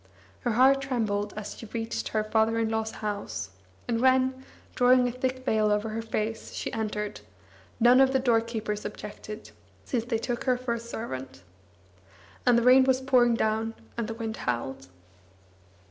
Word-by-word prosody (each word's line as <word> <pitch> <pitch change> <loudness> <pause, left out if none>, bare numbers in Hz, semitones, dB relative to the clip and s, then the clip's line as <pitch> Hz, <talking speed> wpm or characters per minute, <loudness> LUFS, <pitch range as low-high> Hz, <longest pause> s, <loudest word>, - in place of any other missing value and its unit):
Her 240 -3 -1
heart 265 +4 +5
trembled 215 -6 -1
as 210 -1 -5
she 225 - -10
reached 225 +1 -3
her 215 -1 0
father 220 +1 +2
in 225 -1 +1
law's 220 0 -1 0.2
house; 110 - -4 0.4
and 230 -1 0
when, 260 0 +3 0.3
drawing 250 0 +5
a - - -1
thick 255 +1 -3
veil 215 -3 +2
over 210 +1 0
her 220 +1 -3
face, 225 0 -3
she - - -4
entered, 210 -2 -3 0.6
none 245 +3 +6
of 265 0 +5
the 265 - +3
doorkeepers 225 -4 0
objected, 210 +1 -8 0.3
since 235 -3 -1
they 235 -2 0
took 240 +1 -3
her 255 -2 +3
for 250 -1 -2
a 235 - -3
servant. 135 - -7 1.0
And 245 -1 +6
the 235 - +2
rain 255 +2 +7
was 260 0 +3
pouring 250 -3 +4
down, 220 0 0 0.2
and 235 -2 -2
the 225 - -5
wind 225 -1 -4
howled. 125 -3 -3
225 Hz, 165 wpm, -27 LUFS, 215-250 Hz, 1.0 s, rain